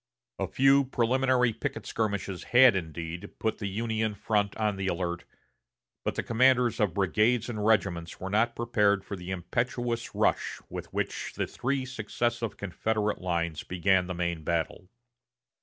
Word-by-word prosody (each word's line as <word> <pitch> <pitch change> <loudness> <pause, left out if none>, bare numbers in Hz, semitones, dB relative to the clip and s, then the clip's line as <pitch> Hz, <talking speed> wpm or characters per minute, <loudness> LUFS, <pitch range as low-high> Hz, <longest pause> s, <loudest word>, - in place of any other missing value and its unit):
A - - 0
few 135 +1 +4
preliminary 125 0 +2
picket 135 +5 -4
skirmishes 100 -4 -2
had, 125 -3 +7
indeed, 85 -1 -5
put 110 - -1
the 100 - -2
Union 110 +1 -1
front 100 0 0
on 105 -2 +1
the 95 0 -3
alert, 85 -1 -2 0.8
but - - -1
the - - -1
commanders 125 0 +3
of 100 -5 +1
brigades 110 +5 +2
and 105 -3 -3
regiments 95 -6 +1
were 95 0 -5
not 115 +3 +2
prepared 105 -5 +2
for 100 - -5
the 90 -1 -8
impetuous 115 +6 -2
rush - - +1
with - - -7
which - - -3
the - - -1
three 130 +1 -2
successive 120 -2 -2
Confederate 105 +2 -1
lines 85 -3 -1
began 90 +1 +1
the 90 - -4
main 85 -2 -2
battle. 85 +2 -2
105 Hz, 150 wpm, -28 LUFS, 90-120 Hz, 0.8 s, had